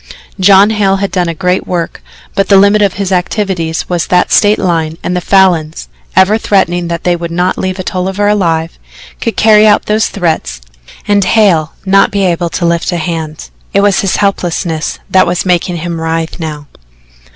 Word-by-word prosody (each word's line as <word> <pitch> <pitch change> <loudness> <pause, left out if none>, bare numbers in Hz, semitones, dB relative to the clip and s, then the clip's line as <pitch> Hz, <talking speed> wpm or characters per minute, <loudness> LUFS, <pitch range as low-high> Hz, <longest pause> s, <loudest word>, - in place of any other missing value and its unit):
John 195 +2 +5
Hale 200 -3 +1
had 195 -1 -3
done 175 -2 -1
a 165 - -4
great 180 +3 -1
work, 170 -2 -3 0.3
but 195 - 0
the 200 - +6
limit 200 +2 +4
of 200 -2 +2
his 195 -1 -4
activities 180 -3 -2
was 175 -3 -2
that 180 0 +1
State 210 0 +4
line 165 -3 -1
and 180 - -2
the 180 - -1
Falins, 175 -5 +1 0.3
ever 190 +4 +4
threatening 175 -5 0
that 170 0 -4
they 175 -1 +1
would 170 0 -5
not 180 +2 -1
leave 185 0 -3
a 185 - -4
Tolliver 190 +3 -2
alive, 165 -5 0 0.4
could 230 - -3
carry 215 -1 +5
out 210 - +3
those 215 +1 +1
threats 160 - -2 0.5
and 205 -1 +2
Hale 185 -7 +2
not 195 +1 +3
be 200 -1 -1
able 175 -1 0
to 170 - -3
lift 170 +2 0
a 175 - -2
hand. 160 -2 -5 0.2
It 200 - +4
was 200 -1 +2
his 195 - 0
helplessness 175 -5 -2
that 185 -1 +3
was 175 +2 -1
making 180 -1 0
him 170 0 -5
writhe 165 +1 -3
now. 150 -3 -6
180 Hz, 185 wpm, -11 LUFS, 170-200 Hz, 0.5 s, the